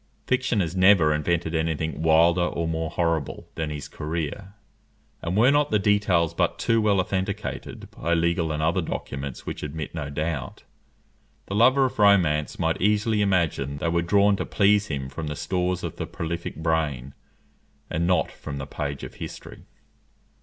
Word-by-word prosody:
Fiction 125 -4 +1
has 85 0 -3
never 95 -5 +5
invented 80 +2 -1
any 80 0 0
thing 80 +1 -4
wilder 85 +2 +4
or 85 -1 -1
more 80 0 -2
horrible 85 -4 -2
than 80 -1 -3
his 75 -2 -6
career; 85 +5 -5 0.7
and 85 +3 -2
were 120 +5 +6
not 145 0 +2
the 105 - +3
details 100 -5 +2
but - - 0
too 115 -1 +2
well 105 -2 +3
authenticated 100 +2 -3
by 85 +1 -1
legal 85 -1 +1
and 75 0 -2
other 80 +2 +2
documents 70 -1 -5
which - - -5
admit 75 0 -5
no 75 -3 -4
doubt, 75 -1 -4 0.8
the - - -6
lover 130 +5 +5
of 125 - -4
romance 85 -8 +3
might 80 -2 -1
easily 105 +2 +2
imagine 80 -8 0
they 85 - -1
were 85 0 +1
drawn 100 +3 +3
to - - -2
please 105 0 +3
him 70 -5 -3
from 80 +3 -6
the 75 - -3
stores 90 +4 -1
of - - -5
the - - -4
prolific 85 +1 -5
brain, 75 -5 -1 0.7
and 85 +2 -1
not 90 -3 +2
from 70 - -7
the 70 - -5
page 70 0 -5
of - - -7
history. - - -9
85 Hz, 170 wpm, -25 LUFS, 75-100 Hz, 0.8 s, were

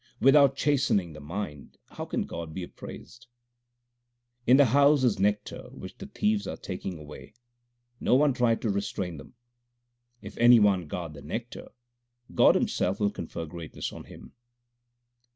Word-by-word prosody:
Without 135 0 +6
chastening 135 - +1
the 75 - -10
mind 75 -2 -7
how - - -6
can - - -2
God 80 -2 -7
be 95 - -4
appraised? 120 +7 -11 1.2
In 130 - +7
the 140 - +7
house 140 +3 +4
is 115 -6 +2
nectar 105 +1 -1
which 95 - -10
the 195 - -8
thieves 210 0 -1
are - - -5
taking 90 -1 -6
away: 75 +7 -12 0.6
1 - - -9
No - - +4
one 145 0 +4
tried 120 -2 +1
to 110 - +1
restrain 95 -3 -3
them. 70 - -13 0.8
If - - -11
any 120 0 +7
one 95 -5 +2
guard 85 0 -5
the 70 - -11
nectar, 115 +8 -6 0.6
God - - +5
Himself 95 +2 0
will 100 -1 +1
confer 80 -2 -6
greatness 80 -1 -7
on - - -10
him. - - -14
105 Hz, 155 wpm, -27 LUFS, 85-130 Hz, 1.2 s, In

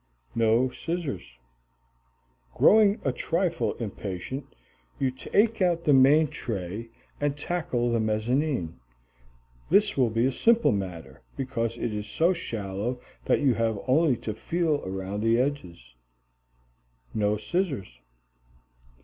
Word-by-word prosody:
No 115 +2 +3
scissors. 125 - -5 1.2
Growing 215 0 +5
a 135 - +2
trifle 170 +5 -1
impatient, 105 +4 -5 0.5
you 130 -1 +1
take 210 - +1
out 175 -2 +2
the 145 - +4
main 140 +4 +6
tray 105 0 -5 0.3
and 145 0 -1
tackle 145 -7 -1
the 115 - +1
mezzanine. 110 - -1 0.9
This 205 0 +4
will 125 -4 +3
be 115 +2 +1
a 135 - +2
simple 235 - +3
matter, 85 -9 -5 0.2
because 120 -4 -2
it 115 - -2
is 105 0 -4
so 165 - +2
shallow 115 - -4 0.3
that - - +2
you 135 -3 +4
have 115 -2 0
only 140 -1 +3
to 110 - -2
feel 160 +6 -1
around 95 +2 -4
the 115 +1 +3
edges. 90 - -3 1.2
No 105 -1 +1
scissors. 135 - -3
125 Hz, 120 wpm, -27 LUFS, 105-155 Hz, 1.2 s, main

